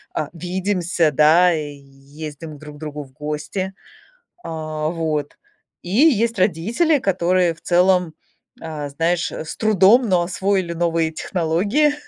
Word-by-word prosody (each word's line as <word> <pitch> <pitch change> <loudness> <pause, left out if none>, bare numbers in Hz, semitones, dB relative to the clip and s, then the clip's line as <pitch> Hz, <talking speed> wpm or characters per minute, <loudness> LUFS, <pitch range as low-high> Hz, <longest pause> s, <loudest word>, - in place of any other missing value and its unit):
а, 150 - -2
видимся, 180 -2 0
да, 160 +5 +5
и 150 -2 -4
ездим 145 +3 -10
друг 150 0 -11
к - - -16
другу 150 -1 -6
в 130 -2 -19
гости. 150 +7 -4 0.7
А, 155 -1 -4
вот. 155 -3 -3 0.5
И 175 - -8
есть 235 -3 +3
родители, 225 - +2
которые 180 -3 +1
в 155 - -21
целом, 180 -1 +2 0.5
а, 155 -3 -5
знаешь, 165 +4 0
с 155 - -7
трудом, 215 +3 +4
но 180 -2 +3
освоили 190 0 -1
новые 165 -1 0
технологии. 195 - +1
170 Hz, 130 wpm, -20 LUFS, 155-190 Hz, 0.7 s, да